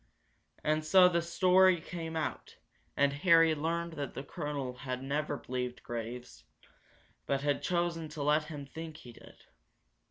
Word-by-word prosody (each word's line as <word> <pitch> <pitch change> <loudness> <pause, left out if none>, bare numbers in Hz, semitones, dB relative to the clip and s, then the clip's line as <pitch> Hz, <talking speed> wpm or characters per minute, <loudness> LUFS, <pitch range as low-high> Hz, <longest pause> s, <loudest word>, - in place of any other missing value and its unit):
And 155 +1 +1
so 180 +4 +7
the 170 -1 +1
story 180 +1 +4
came 165 0 -6
out, 160 - -4 0.4
and 140 0 +3
Harry 165 +1 +5
learned 165 +2 -2
that 145 -3 -5
the 135 - -5
colonel 140 -2 -4
had 130 -1 -5
never 145 +1 -2
believed 125 0 -4
Graves, 120 - -6 0.8
but 140 0 0
had 145 0 0
chosen 170 -2 -1
to 150 -1 -5
let 150 +1 +3
him 150 -2 -7
think 160 +2 -8
he 120 -5 -12
did. - - -16
150 Hz, 150 wpm, -31 LUFS, 140-165 Hz, 0.8 s, so